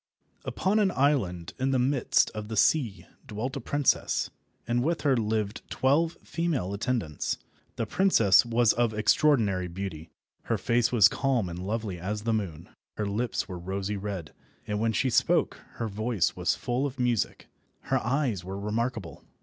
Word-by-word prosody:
UPON 200 +3 +1
an 205 -2 +3
island 125 - 0
in 130 +1 +1
the 135 - +2
midst 130 +1 +2
of 105 -1 -6
the 110 0 -5
sea 105 - +2 0.2
dwelt 125 +4 -4
a 140 - -4
princess, 145 -3 +1 0.4
and 120 +1 +1
with 165 +4 0
her 140 -3 +3
lived 110 -2 -1
twelve 160 +5 +1
female 160 - -2
attendants. 100 - -2 0.4
The 115 - -2
princess 110 - +4
was 120 -1 +3
of 115 -2 +1
extraordinary 110 -5 +3
beauty. 85 -3 -6 0.4
Her - - 0
face 120 0 +1
was 110 -5 +7
calm 125 -6 0
and 85 0 -6
lovely 100 -1 -3
as 105 +4 -3
the 115 0 +1
moon, 90 -7 -3 0.3
her 105 - -1
lips 110 +3 -2
were 90 -3 -6
rosy 95 +3 -3
red, 95 -5 -5 0.3
and 105 -1 -2
when 115 +1 +1
she 125 +5 +1
spoke - - +2 0.2
her 115 - -3
voice 110 -3 0
was - - +1
full 125 +4 -1
of 135 -1 -9
music. 120 -5 0 0.4
Her - - 0
eyes 120 - 0
were 95 +2 -6
remarkable. 110 -2 -3
110 Hz, 165 wpm, -28 LUFS, 100-130 Hz, 0.4 s, was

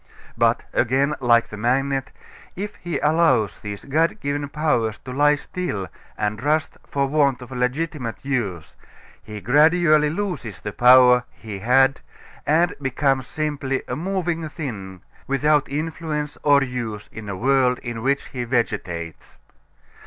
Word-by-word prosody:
But, - - +2
again, 135 +4 +2
like 120 -2 +3
the 105 - -8
magnet, 135 +4 0 0.5
if 205 +3 -5
he 170 -4 -3
allows 150 -9 +2
these 100 -1 -7
God 160 +8 +1
given 145 -3 -3
powers 120 -8 0
to 130 - -6
lie 145 +2 +4
still 145 - -4 0.3
and 105 +1 -2
rust 150 +2 0
for 140 -1 0
want 140 -2 +2
of 125 - -13
legitimate 125 0 -2
use 100 - -3 0.5
he 105 -1 -8
gradually 155 - +4
loses 160 - -4
the 105 - -6
power 125 0 +6
he 105 -4 -9
had 135 +5 +3 0.5
and 170 +4 +3
becomes 135 -1 0
simply 145 -3 -2
a - - -3
moving 170 -2 -2
thing 100 - -7 0.3
without 145 +1 +2
influence 150 0 -3
or 140 -1 +4
use 120 -5 -5
in 110 -2 -8
a 100 - -3
world 125 +3 +2
in 120 -2 -5
which 140 +3 +1
he 125 -2 -4
vegetates. 95 -9 -3
135 Hz, 140 wpm, -22 LUFS, 115-150 Hz, 0.5 s, power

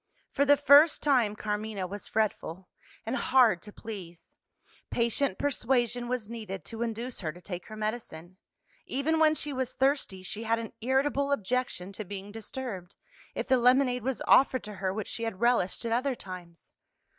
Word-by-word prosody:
For 280 - +2
the 285 0 +6
first 290 +3 +6
time, 245 -8 +3
Carmina 210 -2 -3
was 200 +2 -7
fretful, 190 -4 -2 0.4
and 230 +3 -1
hard 245 -10 +4
to 210 - -10
please: 180 -7 -9 0.5
patient 235 -2 +1
persuasion 245 -3 0
was 245 -3 -2
needed 215 -4 -6
to 225 0 -7
induce 235 +2 -3
her 160 -5 -3
to 175 - -14
take 180 -1 -7
her 215 - -8
medicine. 215 -6 -5 0.5
Even 315 +4 0
when 310 -1 +5
she 295 -1 -2
was 260 -1 -2
thirsty, 265 -9 0
she 215 +4 -6
had 230 0 +1
an 225 -1 -6
irritable 275 +3 +1
objection 245 -6 -1
to 205 +2 -6
being 200 +1 -7
disturbed, 220 -4 -6 0.4
if - - -3
the 260 - +4
lemonade 250 +1 +4
was 260 +1 -2
offered 260 -1 +5
to 210 - -7
her 190 -1 -2
which 215 +2 -4
she - - -4
had 225 -5 -3
relished 235 -3 +1
at 230 - -1
other 255 +3 +1
times. 180 -5 -10
230 Hz, 170 wpm, -29 LUFS, 195-260 Hz, 0.5 s, the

